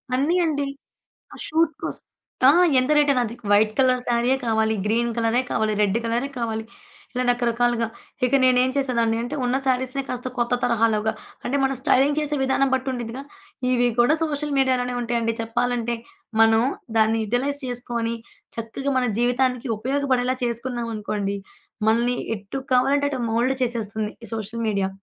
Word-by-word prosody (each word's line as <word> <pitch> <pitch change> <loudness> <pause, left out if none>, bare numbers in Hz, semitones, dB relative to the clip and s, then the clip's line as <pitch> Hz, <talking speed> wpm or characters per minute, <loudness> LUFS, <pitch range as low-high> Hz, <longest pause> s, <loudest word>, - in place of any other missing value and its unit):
అన్నీ 285 +7 +2
అండి. 285 -3 -1 0.7
ఆ - - -11
షూట్ 320 0 +2
కోసం - - -5 0.4
ఆ! - - +10 0.3
ఎంత 255 +3 +1
రేటైన 285 -3 +4
అది. 230 0 -5 0.2
వైట్ 210 +1 +5
కలర్ 255 -1 +4
సారీయే 240 +2 +2
కావాలి, 220 -1 +2
గ్రీన్ 235 +2 +1
కలరే 230 +1 +2
కావాలి, 215 0 +1
రెడ్డు 205 +2 +2
కలరే 235 +4 -1
కావాలి, 220 -2 -2 0.5
ఇలా 250 - -1
రకరకాలుగా. 240 -1 +1 0.4
ఇక 250 - -4
నేనేం 255 0 +4
చేసేదాన్ని 235 -5 +1
అంటే 245 +5 -4
ఉన్న 250 +1 +1
శారీస్‌నే 260 +1 0
కాస్త 250 0 -4
కొత్త 240 +1 +1
తరహాలోగా 220 -2 +2 0.3
అంటే 275 - 0
మనం 270 0 +1
స్టైలింగ్ 275 +3 +3
చేసే 300 0 -1
విధానం 265 0 +2
బట్టి 260 +1 -2
ఉంటుందిగా. 240 +1 -5 0.5
ఇవి 245 -1 +3
కూడా 285 +7 +4
సోషల్ 295 -1 -2
మీడియా 260 -1 +3
లోనే 245 0 -2
ఉంటాయండి. 230 -1 -1
చెప్పాలంటే. 240 +1 -1 0.4
మనం 225 0 +5 0.3
దాన్ని 220 0 +3
యుటిలైజ్ 265 +6 -1
చేసుకొని 235 -2 -2 0.4
చక్కగా 230 +5 -3
మన 255 - +1
జీవితానికి 250 +1 +1
ఉపయోగపడేలా 255 0 0
చేసుకున్నాం 240 0 -3
అనుకోండి 205 -1 -2 0.5
మనల్ని 235 +3 +2 0.2
ఎటు 200 +6 -6 0.2
కావాలంటే 275 +3 +3
అటు 270 - -3
మోల్డ్ 240 +4 +2
చేసేస్తుంది, 220 -3 -2
ఈ - - -8
సోషల్ 225 +1 -4
మీడియా. 200 -2 0
245 Hz, 150 wpm, -23 LUFS, 230-260 Hz, 0.7 s, ఆ